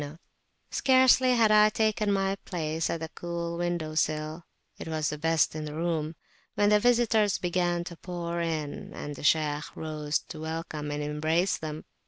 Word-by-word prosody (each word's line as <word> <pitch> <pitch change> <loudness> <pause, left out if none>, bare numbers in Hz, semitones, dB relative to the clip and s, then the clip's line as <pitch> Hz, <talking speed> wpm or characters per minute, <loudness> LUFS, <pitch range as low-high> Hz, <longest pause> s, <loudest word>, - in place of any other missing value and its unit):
291] 145 +4 -13
Scarcely 260 -1 +5
had 225 -2 +4
I 210 0 +7
taken 215 -1 +1
my 195 0 +1
place 160 -2 -2
at 165 - -2
the 160 - -4
cool 170 0 -4
windowsill, 155 -2 -1 0.4
it - - -7
was 155 -2 -1
the 150 - -4
best 165 0 +2
in 155 0 -4
the 150 0 -6
room, 165 -1 -1 0.4
when 205 0 +3
the 210 0 +5
visitors 225 -3 +3
began 175 -1 0
to 175 -1 -9
pour 170 -1 -4
in, 155 -3 -3
and 145 0 -6
the - - -10
Shaykh 150 0 +1
rose 155 -1 -2
to 160 - -7
welcome 160 -2 -4
and 145 0 -3
embrace 155 +5 +1
them. 155 0 -6
165 Hz, 170 wpm, -28 LUFS, 155-185 Hz, 0.4 s, I